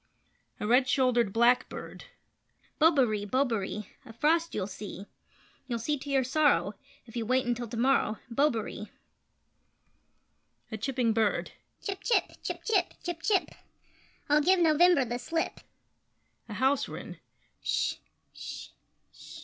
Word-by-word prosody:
[A - - -3
Red 250 +4 +4
Shouldered 250 -5 +2
Blackbird]: 235 +3 +1 0.7
Bobaree! 265 -10 +4
Bobaree! 215 -3 -1 0.2
A 245 - -12
frost 325 +8 +1
you'll 200 - -1
see 200 0 -8 0.6
You'll 240 -2 -2
see 265 +7 -1
to 285 - -8
your 270 -1 +2
sorrow, 295 +4 +2 0.3
If 230 -1 -15
you 235 - -1
wait 255 +3 +1
until 240 0 -2
to 225 - -6
morrow 245 -3 +2
Bobaree! 230 -5 -1 1.8
[A 220 - -3
Chipping 245 -1 0
Bird]: 220 -2 0 0.3
Chip 390 -2 -3
chip! 480 - +2
Chip - - -5
chip! 395 -6 +1
Chip 345 -2 -4
chip! 390 0 +1 0.8
I'll 295 +1 +4
give 375 +5 +4
November 335 -2 +5
the 240 +1 -3
slip! 325 +6 -2 0.9
[A 210 - -6
House 265 +3 +1
Wren]: - - -8 0.4
Sh! - - 0 0.4
Sh! - - -8 0.4
Sh! - - -15
255 Hz, 130 wpm, -29 LUFS, 225-300 Hz, 1.8 s, November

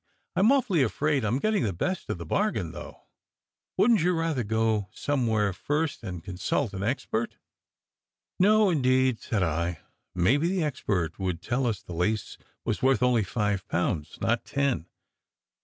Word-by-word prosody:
"I - - +1
m 215 +6 +5
awfully 245 - +3
afraid 140 +2 +1
I - - +1
m 115 +5 +1
getting 215 +5 +1
the 105 -4 0
best 185 - -3
of - - -2
the 85 - -7
bargain, 205 - 0
though. - - -10 0.7
Wouldn 235 -2 +5
t 165 - 0
you 180 - +3
rather 165 -6 0
go 110 -2 0
somewhere 110 -8 0
first 150 - -2
and 90 -7 -6
consult 95 +5 -2
an 95 - -4
expert?" 115 0 -2 1.0
"No, 210 +1 +5
indeed," 130 -5 +2
said 105 -5 -1
I. 85 0 -1 0.3
"Maybe 130 - +3
the 185 -1 0
expert 95 - -2
would 90 -3 -2
tell 120 +7 -1
us 105 -3 -2
the 90 - -8
lace 95 +6 -1 0.3
was 110 -2 -1
worth 130 -3 +3
only 125 -3 +3
five 105 -1 -1
pounds, 80 -3 -1
not 115 +1 +1
ten. 135 -11 -1
115 Hz, 165 wpm, -27 LUFS, 95-145 Hz, 1.0 s, m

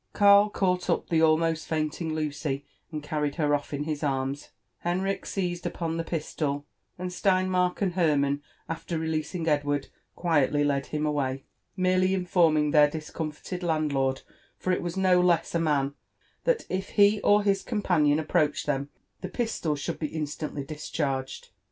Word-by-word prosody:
Karl 200 0 +6
caught 180 -3 0
up - - 0
the 165 -2 +3
almost 160 0 +2
faintinc; 160 +1 -1
Lucy, 150 -2 -2 0.3
and 155 -2 -5
carried 150 -1 -2
her 150 -3 +1
off 145 0 -1
in 145 0 -2
his 150 -1 -3
arms; 135 -1 -2 0.3
Henrich 185 +3 -1
seized 180 -3 -2
upon 165 -1 -3
the 165 - -1
pistol; 150 -3 -3 0.3
and 180 0 -4
Stein 185 0 +2
mark 180 +1 +1
and 185 -3 0
Hermann, 145 -5 +2 0.3
after 165 +1 -4
releasing 160 +1 -2
Edward, 145 -2 0 0.3
quietly 145 -4 +2
led 140 -1 0
him 150 0 -2
away, 135 -3 -1 0.3
merely 185 +1 +3
informing 165 -5 +3
their 150 -1 +6
discomfited 155 +3 -5
landlord, 150 -6 0 0.3
for 185 - 0
it - - 0
was 175 +1 -4
no 185 -1 +4
less 175 -2 +2
a 170 - +2
man, 145 -4 +1 0.5
that - - +2
if 190 +1 -3
he 205 +1 +5
or 205 0 +4
hiseompanion 190 -7 +2
approached 150 -1 +1
them, 140 -1 -1 0.3
the 185 - -5
pistol 220 -9 -1
should 145 +4 -4
be 155 - -1
In* 155 - -1
stantly 145 -1 -5
discharged. 140 -3 -3
160 Hz, 155 wpm, -27 LUFS, 145-180 Hz, 0.5 s, Karl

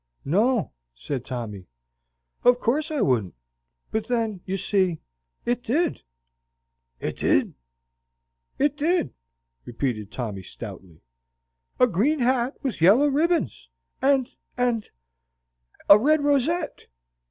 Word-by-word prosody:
"No," 215 - +2 0.2
said 130 - -4
Tommy, 110 -8 -6 0.8
"of 245 0 +5
course 290 +8 0
I 305 -3 -1
wouldn't; 110 - +1 0.6
but 220 0 -2
then, 225 -6 -1
you 190 +1 -1
see, 185 -3 +1 0.5
IT 240 +1 0
DID." 320 +8 0 1.0
"It - - -4
did?" - - +2 1.0
"It 290 0 +2
did!" 310 - 0 0.5
repeated 115 -4 -3
Tommy, 110 -7 -4
stoutly; 85 -2 -10 0.8
"a - - +7
green 245 - +1
hat 250 0 +1
with 255 - -3
yellow 210 - +6
ribbons 310 - 0 0.3
and 270 -2 +3 0.3
and 240 -3 0 1.0
a 200 - +9
red 300 +5 +3
rosette." 290 +4 0
235 Hz, 105 wpm, -25 LUFS, -, 1.0 s, a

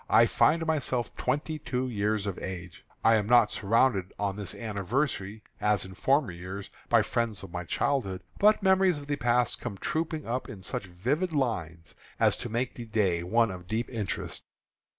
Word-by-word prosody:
I - - +7
find 165 +1 +3
myself 130 -7 -1
twenty 155 +2 -1
two 125 -1 -2
years 105 -2 0
of 100 -3 -3
age. 90 -2 -7 0.2
I 115 0 +6
am 105 -1 -1
not 120 -2 +5
surrounded 105 -2 +2
on 100 -2 -1
this 100 -3 -5
anniversary, 110 0 -2 0.2
as 105 -2 +2
in 95 - -9
former 135 - +2
years, 95 +3 -7 0.2
by - - +6
the - - -1
friends 115 -4 -1
of 95 - -9
my 90 0 -4
childhood. 95 -6 -1 0.2
But 210 0 +5
memories 190 -3 +4
of 145 - -8
the 145 0 -1
past 120 -2 +1
come 110 -5 -5
trooping 160 - -2
up 125 +3 -3
in 95 -4 -9
such 90 - -3
vivid 135 - -1
lines, 85 - -2 0.3
as - - +4
to 120 - -5
make 120 +3 -1
the 120 - -7
day 100 -6 +1
one 115 +5 +2
of 90 -1 -9
deep 115 +6 -2
interest. 110 -5 -3
115 Hz, 185 wpm, -28 LUFS, 95-130 Hz, 0.3 s, I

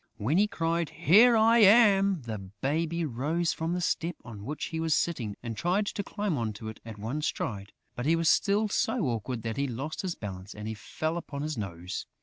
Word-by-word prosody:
When 140 - +1
he 210 - +4
cried, 165 -4 -1
"Here 210 - +6
I 225 +2 +5
am!" 200 - +6
the 110 -3 -5
baby 150 - -2
rose 155 +6 -1
from 165 +1 -2
the 180 - -1
step 175 0 -1
on 110 -4 -9
which 150 +2 -4
he 160 - -1
was 160 -1 +2
sitting 120 -12 -1
and 115 -2 -4
tried 180 - +1
to 205 - -3
climb 200 -10 -2
on 110 -2 -2
to 110 +1 -7
it 110 - -10
at 115 -2 -9
one 115 +9 -3
stride; 105 -9 -3 0.2
but 120 +3 -3
he 165 - +4
was 165 0 0
still 205 +5 +3
so 220 +3 0
awkward 115 0 -3
that 115 -1 -3
he 140 0 0
lost 135 +6 -4
his 185 -3 -3
balance 95 -1 -7
and 105 +1 -5
fell 155 +10 -3
upon 145 -4 -5
his 155 0 -2
nose. 90 -5 -5
150 Hz, 210 wpm, -29 LUFS, 110-175 Hz, 0.2 s, Here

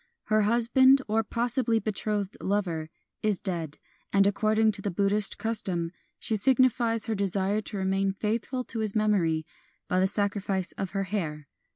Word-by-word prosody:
Her 215 0 +2
hus 235 0 +2
band, 265 +2 +5
or 220 +1 +1
possibly 235 +1 +1
betrothed 210 -2 -2
lover, 175 -6 -1 0.3
is 210 -3 +1
dead; 165 -6 -3 0.3
and, 200 0 +4
according 215 +2 +2
to 205 -1 -4
the 200 - -2
Buddhist 200 +2 +1
custom, 185 -7 -1 0.3
she 225 - -1
signifies 235 -1 +3
her 225 - -1
desire 200 +1 0
to 210 - -6
remain 195 0 0
faithful 225 +5 -2
to 230 - -3
his 215 -1 -2
memory 180 -7 +1 0.4
by 185 -1 +1
the 190 - +3
sacrifice 200 -2 -1
of 195 -1 -5
her 195 -1 0
hair. 160 -7 -4
205 Hz, 160 wpm, -27 LUFS, 190-220 Hz, 0.4 s, band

